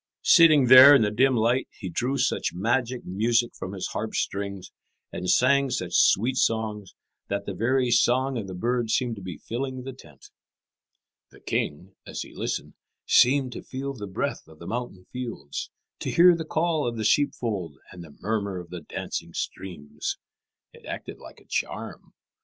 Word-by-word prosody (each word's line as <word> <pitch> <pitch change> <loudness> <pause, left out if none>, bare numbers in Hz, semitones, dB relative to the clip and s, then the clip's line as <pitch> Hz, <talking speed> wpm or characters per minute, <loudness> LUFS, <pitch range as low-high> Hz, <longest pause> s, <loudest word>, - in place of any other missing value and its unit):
Sitting 155 -5 +6
there 130 +3 +10
in 115 - +4
the 105 - 0
dim 130 +4 +3
light, 120 +3 +1
he 95 - -6
drew 125 +10 -1
such 130 -7 0
magic 120 +5 -1
music 115 +5 +1
from 95 - -7
his 95 - -4
harp's - - -4
strings, 100 -1 -4 0.4
and 90 0 -4
sang 140 +2 +4
such - - -3
sweet 125 +6 +3
songs, 110 -4 -1 0.3
that 100 0 -3
the 100 - -4
very 125 +5 +1
song 130 +3 +2
of 110 -5 -4
the 95 - -7
birds 120 +3 0
seemed 125 -3 -1
to - - -9
be 90 -4 -7
filling 130 - -5
the 135 0 -7
tent. 75 - -17 1.0
The - - -18
king, 90 +7 -3
as - - -6
he - - -14
listened, - - -4 0.3
seemed 130 0 +4
to - - -7
feel 135 +1 -5
the 105 -6 -7
breath 95 - -3
of 80 0 -16
the 85 - -11
mountain 115 -6 -5
fields, 115 - -5 0.3
to - - -3
hear 175 +1 +6
the 165 -1 -5
call 160 -3 0
of 120 -1 -3
the 110 - -2
sheepfold 105 - 0
and 90 -1 -10
the 80 -3 -15
murmur 100 -2 -2
of 85 -1 -9
the 90 -2 -6
dancing - - -6
streams. 85 -6 -5 0.6
It - - -17
acted - - -7
like - - -13
a - - -23
charm. - - -5
115 Hz, 175 wpm, -25 LUFS, 95-130 Hz, 1.0 s, there